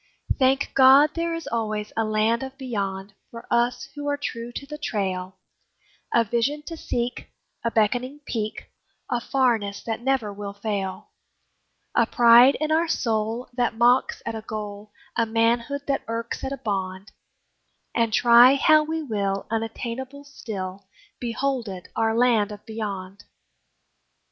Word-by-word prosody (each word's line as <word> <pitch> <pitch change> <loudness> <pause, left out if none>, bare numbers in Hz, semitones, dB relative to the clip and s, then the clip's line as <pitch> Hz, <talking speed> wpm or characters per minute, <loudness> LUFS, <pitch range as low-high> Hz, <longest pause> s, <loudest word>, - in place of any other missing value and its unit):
Thank 265 +1 +2
God! 270 +3 +7
there 335 0 -1
is 330 - -6
always 215 -2 -2
a 225 - +1
Land 215 +2 +1
of 265 0 -7
Beyond 200 -6 -4 0.2
For 230 0 -10
us 240 +1 +1
who 290 -1 -6
are 285 0 0
true 235 -4 -5
to 280 - -6
the 300 +1 -8
trail; 190 -7 -3 0.7
A 235 - +4
vision 240 +7 -1
to 330 - -7
seek, 245 -6 -3 0.3
a 230 - +1
beckoning 245 +6 0
peak, 215 -5 -4 0.4
A 240 - 0
farness 230 -7 0
that 225 0 -3
never 250 -5 0
will 200 0 -6
fail; 200 -2 -4 0.8
A - - +3
pride 240 +2 +7
in 310 0 -1
our 325 +2 +3
soul 225 -4 -1
that 240 -2 0
mocks 245 +2 +3
at 230 - -3
a 220 - -5
goal, 210 -1 -7 0.2
A 230 -1 +1
manhood 235 +5 +1
that 275 -1 0
irks 230 +1 -4
at 265 - -3
a 275 - -3
bond, 195 -2 -4 0.8
And 230 -1 +1
try 240 +3 +7
how 310 +2 +5
we 320 +1 -3
will, 200 -6 -2
unattainable 235 +5 -4
still, 195 -8 -7 0.3
Behold 245 0 -2
it, 185 -2 -8
our 225 0 +1
Land 230 -4 +3
of 210 0 -10
Beyond! 200 -3 -6
230 Hz, 150 wpm, -24 LUFS, 210-265 Hz, 0.8 s, God